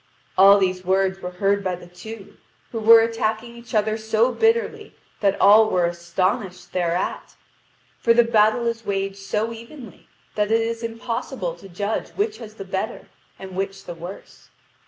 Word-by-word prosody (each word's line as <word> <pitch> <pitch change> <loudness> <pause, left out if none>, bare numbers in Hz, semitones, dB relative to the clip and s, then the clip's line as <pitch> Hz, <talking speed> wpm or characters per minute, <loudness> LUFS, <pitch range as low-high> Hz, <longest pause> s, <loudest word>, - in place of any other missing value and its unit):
All 195 +2 +8
these 185 -2 0
words 190 +1 +1
were 180 - -5
heard 200 +2 0
by 185 -1 -1
the 175 0 -13
two, 195 +4 -11 0.4
who 230 - -3
were 225 +1 +8
attacking 225 0 -2
each 235 -1 -9
other 215 +1 +1
so 220 +2 +1
bitterly 450 - 0 0.2
that 200 -2 +1
all 215 +2 +7
were 180 -1 +2
astonished 180 +1 -2
thereat; 175 0 -2 0.6
for 230 - +3
the 240 +1 +6
battle 225 +1 +3
is 230 -1 -2
waged 195 -1 -2
so 210 +3 -2
evenly 235 0 -12 0.3
that 210 -1 0
it 225 +1 +3
is 230 0 -3
impossible 230 - -4
to 195 - -14
judge 200 +4 -3
which 420 +1 -1
has 215 -2 -10
the 195 - -8
better 190 +4 -4 0.3
and 190 -1 -9
which 195 0 -4
the 175 - -6
worse. 175 +4 -11
210 Hz, 165 wpm, -23 LUFS, 190-230 Hz, 0.6 s, All